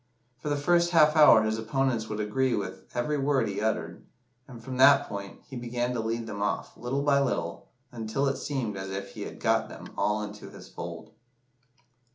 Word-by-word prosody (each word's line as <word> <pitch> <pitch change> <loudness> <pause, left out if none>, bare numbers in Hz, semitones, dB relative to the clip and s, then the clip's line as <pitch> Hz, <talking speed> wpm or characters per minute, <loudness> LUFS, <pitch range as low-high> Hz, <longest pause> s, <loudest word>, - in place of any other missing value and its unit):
For 150 - -4
the 145 - +1
first 170 +4 +3
half 155 -3 +5
hour 150 -8 +8
his 110 0 -1
opponents 115 0 -1
would 105 0 -4
agree 120 +4 +1
with 95 -2 -5
every 145 +5 0
word 140 0 +2
he 100 0 -3
uttered, 110 0 -2 0.4
and 125 -4 -10
from 125 +2 -6
that 140 +2 +6
point 100 -1 -7
he 135 - -9
began 120 0 -2
to 120 - -2
lead 115 +1 -2
them 100 -2 -6
off, 105 - -2
little 135 +3 -2
by 140 -1 +4
little, 135 - -2 0.2
until 115 +3 -2
it 135 - 0
seemed 125 -8 -3
as 95 0 -5
if 100 +1 -5
he - - -9
had - - -7
got - - +1
them - - -10
all 105 0 0
into 105 0 -8
his - - -12
fold." - - -8
120 Hz, 200 wpm, -28 LUFS, 105-140 Hz, 0.4 s, hour